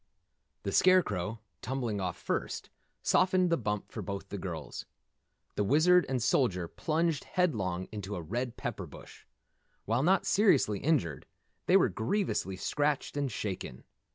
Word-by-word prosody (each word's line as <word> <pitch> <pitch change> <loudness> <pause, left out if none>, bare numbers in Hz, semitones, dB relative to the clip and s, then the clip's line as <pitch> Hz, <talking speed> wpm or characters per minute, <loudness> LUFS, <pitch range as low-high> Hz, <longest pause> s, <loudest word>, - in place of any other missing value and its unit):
The 100 - -2
Scarecrow, 115 - +3 0.2
tumbling 120 -5 -2
off 90 -2 -2
first, - - -3 0.3
softened 185 -1 +3
the - - +5
bump 105 -7 -3
for - - -5
both 100 -1 -5
girls. - - -6 0.7
The 105 - 0
Wizard 165 - +5
and 130 -3 0
Soldier 95 -9 +2
plunged 160 - -1
headlong 95 - 0
into 105 -1 -5
a 90 - -4
red 120 +8 -3
pepper - - -4
bush. - - -13 0.6
While 115 +4 +1
not 185 +6 +3
seriously 150 - +3
injured, 125 - 0 0.4
they - - +7
were - - +4
grievously 115 - -1
scratched 145 +9 -1
and 140 -3 -1
shaken. 95 -12 -5
120 Hz, 135 wpm, -31 LUFS, 100-160 Hz, 0.7 s, they